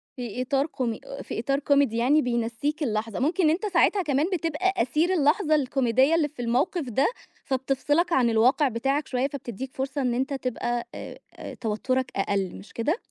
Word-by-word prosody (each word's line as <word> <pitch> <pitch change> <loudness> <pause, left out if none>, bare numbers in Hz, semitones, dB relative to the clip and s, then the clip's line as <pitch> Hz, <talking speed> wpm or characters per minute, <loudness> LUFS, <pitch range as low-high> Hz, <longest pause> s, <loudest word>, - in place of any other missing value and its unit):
في 245 -1 -5
إطار 270 +2 +1
كومي 235 -6 -3 0.2
في - - -5
إطار 275 +4 0
كوميدي، 280 -5 +2
يعني 270 +6 +4
بينسِّيك 240 +5 -1
اللحظة، 220 -3 -2
ممكن 330 +8 +1
إن 305 - +5
أنت 350 +7 0
ساعتها 390 +1 +3
كمان 295 -2 +1
بتبقى 345 +2 0
أسير 310 +7 +1
اللحظة 310 0 +3
الكوميدية 265 +1 +2
اللي 320 -3 +2
في 265 -5 -9
الموقف 260 +5 0
ده، 265 +4 +2 0.4
فبتفصلك 275 +6 0
عن 245 -5 +4
الواقع 250 +6 +4
بتاعك 270 +5 -1
شوية، 255 +1 0
فبتدّيك 265 -3 -6
فرصة 270 +1 -3
إن 250 -2 +1
أنت 265 +4 -1
تبقى، 240 -2 -2
آآ، - - -8 0.4
توترك 255 +4 -1
أقل، 195 -1 -1
مش 195 - -12
كده؟ 295 - 0
265 Hz, 170 wpm, -26 LUFS, 240-300 Hz, 0.4 s, إن